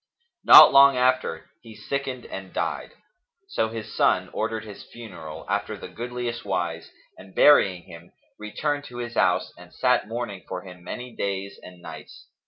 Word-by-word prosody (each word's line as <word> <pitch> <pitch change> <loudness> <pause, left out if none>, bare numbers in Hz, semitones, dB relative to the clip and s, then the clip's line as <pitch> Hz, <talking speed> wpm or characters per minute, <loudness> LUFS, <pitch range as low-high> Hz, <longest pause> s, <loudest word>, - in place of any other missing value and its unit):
Not - - +10
long 140 -1 +7
after, 125 -10 0
he 115 -2 -13
sickened 135 -2 -5
and 95 -1 -8
died; - - -3 0.6
so 110 - -1
his 110 -1 -8
son - - +1
ordered 110 -1 -3
his 105 -2 -10
funeral,[FN#283] 95 -10 -10
after 100 +1 -2
the 95 - -10
goodliest 120 +3 -5
wise, 85 -4 -3 0.3
and 95 0 -15
burying 95 -12 +5
him, 85 +1 -14 0.3
returned 145 +7 -3
to 120 - -11
his 120 -1 -5
house - - +1
and - - -15
sat - - +1
mourning 110 -4 -5
for 90 -1 -6
him 90 -2 -13
many 125 +3 -8
days 100 0 -4
and 90 -1 -14
nights. - - -11
110 Hz, 160 wpm, -24 LUFS, 95-125 Hz, 0.6 s, Not